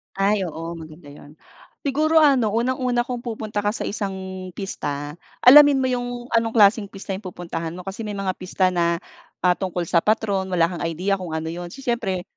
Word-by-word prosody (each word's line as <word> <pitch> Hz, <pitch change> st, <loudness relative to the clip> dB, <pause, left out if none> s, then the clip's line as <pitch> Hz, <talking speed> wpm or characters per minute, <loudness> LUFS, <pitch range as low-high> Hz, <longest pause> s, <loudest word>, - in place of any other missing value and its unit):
Ay 195 Hz, 0 st, +1 dB
oo 165 Hz, 0 st, -6 dB
maganda 155 Hz, -1 st, -12 dB
'yun. 145 Hz, +1 st, -14 dB, 0.5 s
Siguro 310 Hz, +3 st, +3 dB
ano 260 Hz, -8 st, +4 dB
unang-una 250 Hz, +1 st, +1 dB
kung 245 Hz, 0 st, -4 dB
pupunta 215 Hz, -3 st, -3 dB
ka 205 Hz, -, +2 dB
sa -, -, -6 dB
isang 200 Hz, -2 st, -3 dB, 0.4 s
pista. 145 Hz, -6 st, -5 dB, 0.3 s
Alamin 285 Hz, +1 st, +8 dB
mo -, -, +2 dB
yung 245 Hz, 0 st, -3 dB
anong 230 Hz, -1 st, +1 dB
klaseng 210 Hz, 0 st, +5 dB
pista 195 Hz, 0 st, -8 dB
yung 200 Hz, -, -14 dB
pupuntahan 170 Hz, -2 st, -5 dB
mo. 180 Hz, -, -7 dB
Kasi 195 Hz, +4 st, -6 dB
may 205 Hz, -, -4 dB
mga 195 Hz, -1 st, -1 dB
pista 185 Hz, 0 st, +1 dB
na, 170 Hz, -1 st, +1 dB, 0.5 s
ah, 180 Hz, -, +5 dB
tungkol 180 Hz, -2 st, -2 dB
sa 170 Hz, -, +4 dB
patron. 200 Hz, -1 st, 0 dB
Wala 170 Hz, -3 st, +2 dB
kang 175 Hz, -, -5 dB
idea 180 Hz, +5 st, 0 dB
kung 175 Hz, -4 st, -5 dB
ano 160 Hz, 0 st, -3 dB
yun. 175 Hz, +1 st, -6 dB
Si 275 Hz, -, -10 dB
siyempre 210 Hz, -7 st, -1 dB
195 Hz, 190 wpm, -22 LUFS, 175-235 Hz, 0.5 s, Alamin